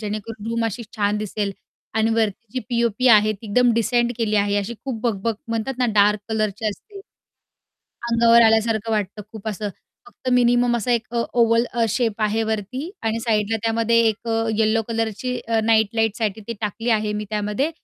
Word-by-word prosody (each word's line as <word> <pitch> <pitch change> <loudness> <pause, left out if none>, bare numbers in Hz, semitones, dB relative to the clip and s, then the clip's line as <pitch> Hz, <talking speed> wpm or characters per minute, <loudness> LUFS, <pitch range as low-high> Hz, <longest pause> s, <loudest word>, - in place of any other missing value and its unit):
जेणेकरून 215 +1 -5
रूम 230 0 0
अशी 225 +2 -3
छान 205 0 +1
दिसेल 210 -1 -3 0.4
आणि 220 0 +2
वरती 225 +1 -1
जी 260 - -2
पी-ओ-पी 235 0 0
आहे, 215 -2 +6
ती 215 +2 -11
एकदम 245 +4 +3
डिसेंट 240 +1 +1
केली 215 -2 +1
आहे. 205 0 +2
अशी 205 +4 -4
खूप 250 -5 -4
बकबक 225 -1 -1
म्हणतात 230 +4 -2
ना, 250 - +2
डार्क 210 0 +4
कलरचे 215 -1 -1
असते 395 - -9 1.1
अंगावर 235 0 +6
आल्यासारखं 225 0 +1
वाटतं 210 0 -2
खूप 220 -1 -6
असं, 210 0 -3 0.4
फक्त 260 -9 -8
मिनिमम 245 0 +3
असा 235 +2 -2
एक 230 -2 0
अ, 235 - +2 0.2
ओवल 230 +1 +3
अ, 235 -1 +1
शेप 220 0 -1
आहे 215 +1 +1
वरती 255 - -4
आणि 225 0 -1
साईडला 220 -1 0
त्यामध्ये 230 0 +2
एक 225 +2 -4
अ, 225 0 0
येलो 220 0 +2
कलरची 225 +2 -2
अ, 225 -1 +2
नाईट 220 -1 +3
लाईटसाठी 220 -1 0
ती - - -1
टाकली 225 +3 -2
आहे 210 0 -2
मी 210 0 -3
त्यामध्ये 210 +8 -1
225 Hz, 180 wpm, -22 LUFS, 210-235 Hz, 1.1 s, आहे